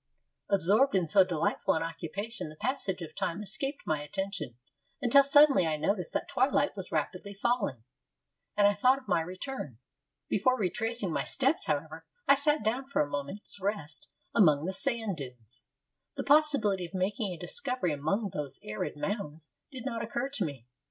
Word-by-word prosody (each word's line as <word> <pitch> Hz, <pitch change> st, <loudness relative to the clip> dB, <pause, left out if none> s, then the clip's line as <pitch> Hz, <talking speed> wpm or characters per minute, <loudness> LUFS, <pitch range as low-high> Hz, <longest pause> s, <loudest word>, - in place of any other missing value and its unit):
Absorbed 200 Hz, +6 st, +3 dB
in 180 Hz, -3 st, +2 dB
so 190 Hz, +5 st, +6 dB
delightful 175 Hz, -4 st, 0 dB
an 160 Hz, -, 0 dB
occupation 165 Hz, +5 st, -5 dB
the 155 Hz, -, -11 dB
passage 195 Hz, -, -2 dB
of 160 Hz, -, -9 dB
time 180 Hz, +5 st, -2 dB
escaped 240 Hz, +9 st, -3 dB
my 155 Hz, -2 st, 0 dB
attention, 190 Hz, -, -4 dB, 0.4 s
until 280 Hz, +1 st, +6 dB
suddenly 280 Hz, -, +6 dB
I 155 Hz, -1 st, 0 dB
noticed 180 Hz, +3 st, -1 dB
that -, -, -1 dB
twilight 275 Hz, +1 st, +2 dB
was 190 Hz, -2 st, -6 dB
rapidly 180 Hz, +6 st, -2 dB
falling, 200 Hz, -, 0 dB, 0.7 s
and 205 Hz, -, +5 dB
I 205 Hz, -, +5 dB
thought 250 Hz, +6 st, +4 dB
of 270 Hz, -, -13 dB
my 175 Hz, -4 st, +2 dB
return. 180 Hz, -, -6 dB, 0.5 s
Before 255 Hz, +6 st, +2 dB
retracing 220 Hz, -1 st, -1 dB
my -, -, 0 dB
steps, 275 Hz, +3 st, +1 dB
however, 155 Hz, +2 st, -3 dB, 0.2 s
I -, -, +8 dB
sat 295 Hz, -1 st, +2 dB
down 245 Hz, +5 st, -1 dB
for 280 Hz, -, +2 dB
a -, -, -5 dB
moment's 145 Hz, +8 st, -5 dB
rest 160 Hz, -7 st, -3 dB, 0.2 s
among 155 Hz, -8 st, +5 dB
the 190 Hz, -, -2 dB
sand 225 Hz, -3 st, -1 dB
dunes. 125 Hz, -4 st, -10 dB, 0.5 s
The -, -, -3 dB
possibility 280 Hz, -, +3 dB
of 190 Hz, -, -11 dB
making 195 Hz, +2 st, -1 dB
a 175 Hz, -, -6 dB
discovery 250 Hz, -, -1 dB
among 195 Hz, +8 st, -1 dB
those 145 Hz, -2 st, -4 dB
arid 105 Hz, +6 st, -4 dB
mounds 155 Hz, -, -4 dB, 0.2 s
did 255 Hz, -3 st, -8 dB
not 230 Hz, -4 st, -2 dB
occur 240 Hz, +4 st, -2 dB
to 280 Hz, -, -1 dB
me. 135 Hz, -6 st, -5 dB
195 Hz, 170 wpm, -30 LUFS, 160-245 Hz, 0.7 s, I